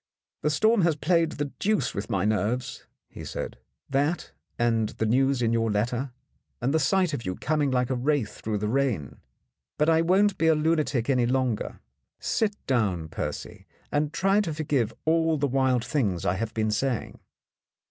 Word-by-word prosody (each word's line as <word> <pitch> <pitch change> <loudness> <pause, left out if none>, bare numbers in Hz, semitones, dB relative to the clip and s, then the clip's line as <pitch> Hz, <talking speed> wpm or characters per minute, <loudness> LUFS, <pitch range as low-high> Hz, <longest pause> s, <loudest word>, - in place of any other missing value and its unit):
"The 150 - +1
storm 215 +8 +3
has 165 -3 +3
played 165 +1 +1
the 145 -1 -3
deuce 215 +1 +1
with 100 +1 -4
my 95 -1 0
nerves," 110 +4 -1 0.2
he - - -10
said, - - -5 0.3
"that 145 +5 0 0.3
and 115 -2 +1
the 110 - -3
news 130 +2 +2
in 115 0 +2
your 115 -1 +1
letter, 120 +5 -1 0.5
and 130 +4 0
the 160 - +3
sight 180 +3 +2
of 120 - -3
you 90 -1 -3
coming 150 -2 0
like 125 -1 0
a - - +1
wraith 130 -3 -1
through 110 -1 -1
the 105 +1 -2
rain. 115 - -1 0.6
But 150 +2 +3
I 160 0 +4
won't 190 +4 +3
be 165 - +3
a 160 - +5
lunatic 150 -6 +1
any 125 -3 +2
longer. 130 -3 -1 0.4
Sit 210 -2 0
down, 100 -11 0
Percy, - - -6 0.2
and 145 0 0
try 195 +5 +2
to 165 -7 -3
forgive 140 -7 0
all 160 0 +2
the 145 - +1
wild 130 -2 +1
things 105 - -1
I - - +2
have 110 +3 -4
been 110 -1 +1
saying. 120 +2 -2
135 Hz, 180 wpm, -26 LUFS, 115-155 Hz, 0.6 s, a